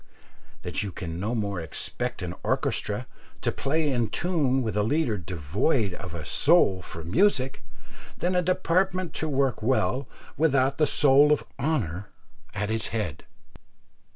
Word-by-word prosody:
that - - -1
you 100 - -3
can 85 -3 -6
no 110 +6 -1
more 100 -4 -2
expect 80 +4 -3
an 90 -1 -4
orchestra - - -1 0.3
to - - 0
play 150 +1 0
in 120 -3 +1
tune 140 -2 +1
with 110 -3 -3
a 105 - +2
leader 125 +1 +1
devoid 95 - -1
of 90 -1 -7
a 80 -2 -6
soul 135 - +4
for 85 -2 -8
music, 135 - +1 0.5
than 180 +1 0
a 180 - +4
department 185 0 0
to 160 - 0
work 135 -4 0
well 130 +2 +1 0.3
without 140 -2 +2
the 150 - +4
soul 145 +1 +5
of 150 - +2 0.2
honour 105 - -1 0.5
at 105 +1 -1
its 110 0 0
head? 105 -11 -4
130 Hz, 150 wpm, -26 LUFS, 100-155 Hz, 0.5 s, soul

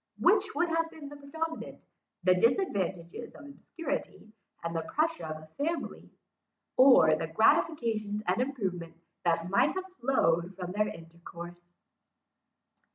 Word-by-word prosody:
Which 405 -6 +3
would 345 +3 +1
have 330 0 +1
been 305 -3 -10
predominant; 305 +3 -6 0.4
the 185 0 +6
disadvantages 190 - 0
of 295 - -12
obscurity, 280 -6 -6 0.3
and 170 0 -3
the 165 - 0
pressure 310 - -1
of 155 0 -4
a 155 - -7
family; 330 +2 -3 0.7
or 250 - +7
the 160 +1 -1
gratifications 220 - +2
and 185 +6 +1
improvement 190 -11 -3 0.3
that 170 +1 +1
might 200 - +3
have 375 0 -3
flowed 180 -9 +1
from 180 -1 -5
their 210 +2 +1
intercourse? 170 +1 -10
215 Hz, 125 wpm, -30 LUFS, -, 0.7 s, or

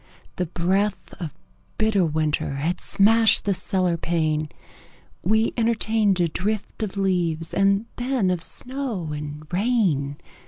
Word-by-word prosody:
The 180 - -1
breath 190 +4 -1
of 165 -5 -4 0.5
bitter 215 -3 +2
weather 155 -3 0
Had 165 +6 -2
smashed 225 +2 +4
the 200 - +2
cellar 185 -1 0
pane: 155 -2 0 0.7
We 220 +4 +2
entertained 220 -4 +2
a 175 - +3
drift 205 +7 -3
of 205 -2 -3
leaves 175 -4 0
And 200 +2 +3
then 245 -6 +1
of 180 -2 -1
snow 245 - -4
and 150 0 -6
rain. 180 - +1
185 Hz, 125 wpm, -24 LUFS, 165-215 Hz, 0.7 s, smashed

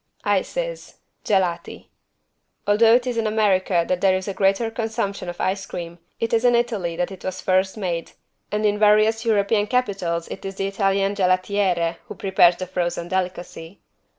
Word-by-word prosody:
ICES - - -2 0.3
(Gelati) 185 -4 -1 0.8
Although 225 +3 +5
it 245 0 +1
is 245 -2 -2
in 225 -1 +1
America 195 -5 +2
that 185 0 -1
there 190 -1 +4
is 185 - -6
a 200 - -2
greater 195 +4 +1
consumption 220 -5 -3
of 175 - -8
ice 195 +1 -1
cream, 170 0 -7 0.2
it 230 0 -2
is 225 0 +2
in 245 -1 +4
Italy 220 -8 -1
that 180 +2 -2
it 190 - -10
was 185 0 -4
first 190 +2 +1
made, 175 -5 -3 0.4
and 210 +1 0
in 210 0 +1
various 215 +2 +4
European 210 -1 +2
capitals 195 -9 -1
it - - -8
is 195 0 -5
the 195 - -2
Italian 195 0 +1
=gelatiere= 185 -3 +1
who - - -8
prepares 190 -3 +4
the 185 - -5
frozen 175 -1 -3
delicacy. 180 -1 -4
195 Hz, 170 wpm, -22 LUFS, 185-215 Hz, 0.8 s, Although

